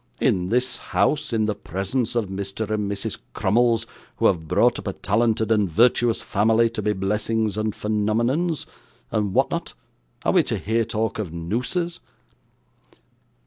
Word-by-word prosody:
'In 90 0 +1
this 125 +3 +1 0.2
house, 150 - +2
in 110 -2 +1
the 105 - 0
presence 100 +6 -3
of 115 -3 +1
Mr. 100 +3 -4
and 105 -2 -1
Mrs. 100 -1 -4 0.2
Crummles, 115 +2 +2 0.3
who - - -1
have 80 -4 +2
brought 120 +8 +3
up - - -8
a 95 - -1
talented 110 +2 +1
and 105 -4 +3
virtuous 120 +5 +3
family, 115 +3 +2
to 115 - -3
be 105 0 +1
blessings 105 +2 0
and 110 0 -1
phenomenons, 115 +10 0 0.5
and 105 -3 -1
what - - +3
not, - - -4 0.5
are - - +4
we - - +6
to - - -2
hear 115 +2 0
talk 110 -1 -2
of 100 -7 -3
nooses? 125 - -2
110 Hz, 155 wpm, -23 LUFS, 100-115 Hz, 0.5 s, we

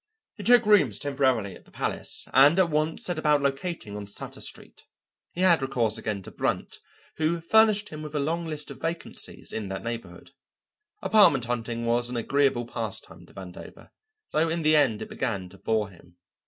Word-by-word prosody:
He - - -9
took 240 -2 +6
rooms 175 - +4
temporarily 130 -7 0
at - - -16
the - - -20
Palace - - -3
and 140 +6 +7
at 180 -3 +3
once 155 +1 0
set 175 -3 0
about 150 -1 +3
locating 140 - -2
on 105 -1 -6
Sutter 100 - -6
Street. - - -6 0.4
He 175 - -5
had 170 -5 +5
recourse 120 -5 0
again 105 -3 -3
to - - -10
Brunt, - - -2 0.4
who 160 +2 +1
furnished 215 +4 +4
him 155 0 -8
with 150 0 -7
a - - +1
long 165 +4 -1
list 150 -2 -3
of - - -11
vacancies 165 +1 -5
in 105 -3 -4
that 95 0 -5
neighbourhood. 115 0 -7 0.7
Apartment 195 - +5
hunting 115 -1 -3
was 120 +1 +1
an 125 - -3
agreeable 135 0 +1
pastime 115 -3 -6
to - - -19
Vandover, 95 -2 -11 0.4
though 160 +1 +2
in 165 0 -1
the 155 0 +5
end 135 -8 +3
it - - -10
began 100 -8 -3
to 95 +1 -16
bore 110 -2 0
him. 85 -1 -19
135 Hz, 185 wpm, -26 LUFS, 110-160 Hz, 0.7 s, and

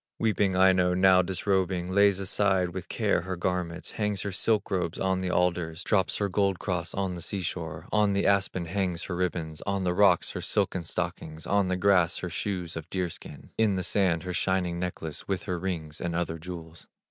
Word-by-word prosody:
Weeping 105 -4 +1
Aino, 90 -1 +4
now 95 0 +6
disrobing, 95 -1 0
Lays 100 0 +4
aside 95 -1 +2
with 90 0 -7
care - - +1
her 95 +1 -4
garments, 90 -1 -2
Hangs 105 -2 -1
her 100 - -3
silk 105 +3 +1
robes 90 -3 -1
on 95 -1 +1
the 95 -1 -2
alders, 90 -2 0
Drops 95 -4 +1
her 100 - 0
gold 100 -1 +1
cross 90 -4 -3
on 95 -2 -1
the 85 - -6
sea 95 +3 -3
shore, 80 -2 -5
On 105 -2 +3
the 100 - +1
aspen 95 -3 +1
hangs 90 -1 -1
her 90 - -4
ribbons, 85 -3 -2
On 100 -1 0
the 90 -1 +1
rocks 100 +2 +4
her - - -5
silken 90 -3 0
stockings, 80 0 -4
On 100 -1 +2
the 90 0 0
grass 90 -3 +3
her 90 - -4
shoes 90 0 -3
of 80 +1 -7
deer 90 -2 -1
skin, - - -11
In 110 -3 +3
the 95 - -1
sand 90 -4 +1
her 90 -1 -4
shining 90 0 0
necklace, 85 -4 -5
With 95 -2 -2
her 90 -1 -3
rings 85 -5 -4
and 85 -1 -2
other 80 -1 -2
jewels. 85 -1 -9
90 Hz, 200 wpm, -28 LUFS, 85-95 Hz, -, now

